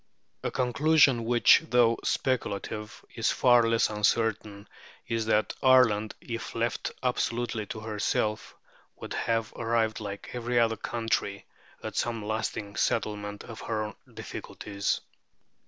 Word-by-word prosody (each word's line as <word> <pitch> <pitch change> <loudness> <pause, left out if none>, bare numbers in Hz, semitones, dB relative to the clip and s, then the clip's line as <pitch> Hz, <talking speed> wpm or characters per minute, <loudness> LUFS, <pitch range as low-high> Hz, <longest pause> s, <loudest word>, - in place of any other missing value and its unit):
A - - -1
conclusion 130 -1 +3
which, 120 +5 +6
though 120 -2 +4
speculative, 105 -3 -2
is 115 - 0
far 120 -2 +5
less 115 0 +3
uncertain, 105 -1 0 0.4
is 115 -1 -1
that 110 -1 +2
Ireland, 120 -5 +4
if 115 -1 -6
left 115 0 -1
absolutely 120 -3 -1
to 110 - -6
herself, 105 0 -2 0.4
would - - -7
have 115 -1 -1
arrived, 115 -1 0
like 100 -2 -7
every 120 0 0
other 115 -1 +3
country, 110 -3 -2 0.4
at - - -5
some 115 -3 -1
lasting 110 -1 -3
settlement 105 -2 -1
of 115 -2 -9
her 110 -2 -3 0.2
difficulties" 100 -1 -4
(p. - - -33
115 Hz, 125 wpm, -28 LUFS, 105-120 Hz, 0.4 s, which